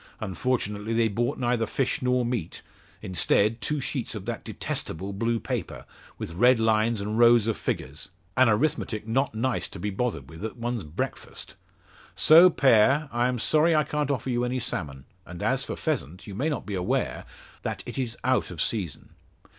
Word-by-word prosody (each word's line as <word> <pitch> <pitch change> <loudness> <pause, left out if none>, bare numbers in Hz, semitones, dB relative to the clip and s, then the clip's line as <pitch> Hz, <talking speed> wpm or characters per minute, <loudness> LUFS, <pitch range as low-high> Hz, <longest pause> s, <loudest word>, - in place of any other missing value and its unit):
Unfortunately, 105 +1 -2
they 115 0 +3
brought 120 +4 -1
neither 120 -2 0
fish 135 +4 -1
nor 125 -1 +1
meat; 120 -9 -3 0.4
instead, 105 +4 +1
two 150 -1 -1
sheets 130 -3 -3
of 100 -2 -6
that 115 0 -4
detestable 95 +5 -4
blue 115 +3 0
paper, - - -4 0.3
with 80 - -6
red 120 +7 +4
lines 110 0 +2
and 105 +3 -2
rows 120 -2 +6
of 115 -1 0
figures 70 +3 -4 0.3
an 130 -1 +5
arithmetic 110 -3 0
not 130 +1 0
nice 125 +3 -1
to - - -10
be 105 +3 -3
bothered 95 - -2
with 80 +7 -11
at 110 +2 -5
one's 120 -2 -3
breakfast. 75 +1 -6 0.6
So, 170 +4 +8
Pere; 135 0 +4
I 120 +1 +1
am 125 -1 -1
sorry 155 +7 +3
I 155 - +4
can't 150 -1 -2
offer 135 -2 -1
you 120 0 0
any 125 +1 -1
salmon; 75 - -4 0.2
and 90 -2 -8
as - - +1
for - - -5
pheasant 90 +7 -3
you 100 - -8
may 135 +11 -1
not 145 - -3
be 105 - -5
aware, 90 -1 -1 0.4
that - - -4
it - - -5
is 120 -3 -3
out 130 0 +1
of 85 - -8
season." 95 -4 -2
115 Hz, 180 wpm, -26 LUFS, 100-125 Hz, 0.6 s, So